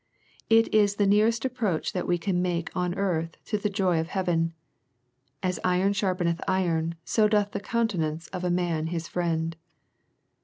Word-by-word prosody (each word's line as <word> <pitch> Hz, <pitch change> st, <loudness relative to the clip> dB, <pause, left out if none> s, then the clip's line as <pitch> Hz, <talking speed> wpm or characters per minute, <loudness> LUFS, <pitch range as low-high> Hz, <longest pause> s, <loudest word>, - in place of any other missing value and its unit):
It 225 Hz, 0 st, +4 dB
is 205 Hz, -2 st, +4 dB
the 205 Hz, -, +2 dB
nearest 220 Hz, +4 st, +3 dB
approach 230 Hz, -10 st, -1 dB
that 180 Hz, -, -2 dB
we 175 Hz, -, +2 dB
can 180 Hz, 0 st, 0 dB
make 175 Hz, -2 st, -2 dB
on 180 Hz, -1 st, -1 dB
earth 165 Hz, -5 st, -1 dB
to 210 Hz, -, -1 dB
the 210 Hz, -, 0 dB
joy 190 Hz, -4 st, +1 dB
of 160 Hz, -, -2 dB
heaven. 165 Hz, -3 st, 0 dB, 0.4 s
" 130 Hz, +4 st, -45 dB
As 185 Hz, -1 st, -1 dB
iron 185 Hz, +2 st, +2 dB
sharpeneth 185 Hz, -4 st, 0 dB
iron, 170 Hz, -3 st, 0 dB
so 215 Hz, -2 st, +3 dB
doth 210 Hz, -1 st, +2 dB
the 200 Hz, -, -3 dB
countenance 185 Hz, -9 st, -1 dB
of 185 Hz, -1 st, -5 dB
a 180 Hz, -, +1 dB
man 175 Hz, -3 st, 0 dB
his 170 Hz, 0 st, -3 dB
friend." 165 Hz, -2 st, -1 dB
180 Hz, 175 wpm, -27 LUFS, 165-200 Hz, 0.4 s, It